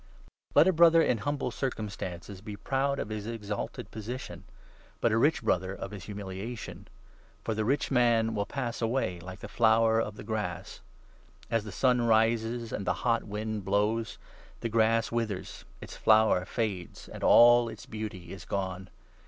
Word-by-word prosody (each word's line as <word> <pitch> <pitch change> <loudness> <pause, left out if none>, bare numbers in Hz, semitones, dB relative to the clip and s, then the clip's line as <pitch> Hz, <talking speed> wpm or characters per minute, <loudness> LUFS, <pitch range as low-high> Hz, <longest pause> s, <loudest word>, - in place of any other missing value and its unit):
Let 150 +5 +7
a 190 - +4
Brother 165 0 +6
in 120 - +1
humble 145 +6 -2
circumstances 100 -6 -5
be 105 0 -7
9 - - -8
proud 140 +1 0
of 105 - -4
his 105 -1 -5
exalted 105 -3 -5
position, 115 +4 -7 0.5
but 120 - +2
a 110 - +2
rich 145 0 +2
Brother 95 -3 0
of 95 - -7
Wp^^ert"ld 100 -4 -8
humiliation; 105 +3 -7 0.6
for 110 - -1
the 110 0 -1
rich 135 +7 0
man 115 -3 +3
will 100 -1 -2
pass 120 -4 -4
away 115 -7 0
10 85 - -13
' - - -11
like 95 +2 -8
the - - -6
flower 115 0 +3
of 105 -2 -4
the - - -9
grass.' 105 -5 -4 0.7
As 115 -2 +1
the 105 - -6
sun 125 +5 +2
rises, 115 0 +1
n - - 0
and 100 - -6
the - - +3
hot 115 -1 +2
wind 105 0 -4
blows, 105 +3 0 0.2
' - - -24
the 115 - -2
grass 115 0 +2
withers, 115 -5 -3 0.2
its - - -9
flower 110 -4 +4
fades,' 100 -5 -4
and - - -9
all 120 0 +7
its - - -10
beauty 105 -6 -6
is 95 -3 -9
gone. 95 -1 -4
110 Hz, 180 wpm, -29 LUFS, 100-120 Hz, 0.7 s, Let